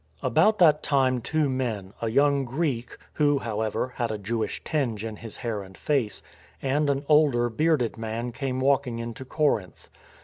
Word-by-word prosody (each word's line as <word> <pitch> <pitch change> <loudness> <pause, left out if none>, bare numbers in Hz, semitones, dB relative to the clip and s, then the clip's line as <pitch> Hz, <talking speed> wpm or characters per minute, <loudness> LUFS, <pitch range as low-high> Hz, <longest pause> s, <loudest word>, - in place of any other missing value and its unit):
About 215 0 +3
that 155 -5 +5
time 130 -3 +2
two 155 +4 0
men 115 -7 -3
— - - -25
a 115 - 0
young 140 +3 +3
Greek 130 -2 -2 0.2
(who, 145 -1 +3
however, 110 +1 -2
had 120 -2 0
a 110 - -2
Jewish 110 +1 -3
tinge 120 -8 -1
in 110 -2 -5
his 115 -1 -9
hair 115 -4 -3
and 95 -1 -12
face) 135 -8 -1 0.4
and 145 +2 +1
an 140 +1 0
older 145 -6 +4
bearded 145 -2 +1
man 115 +2 -3
came 130 +1 -3
walking 135 -3 +1
into 115 +2 -6
Corinth. 130 - -1
125 Hz, 170 wpm, -26 LUFS, 115-145 Hz, 0.4 s, that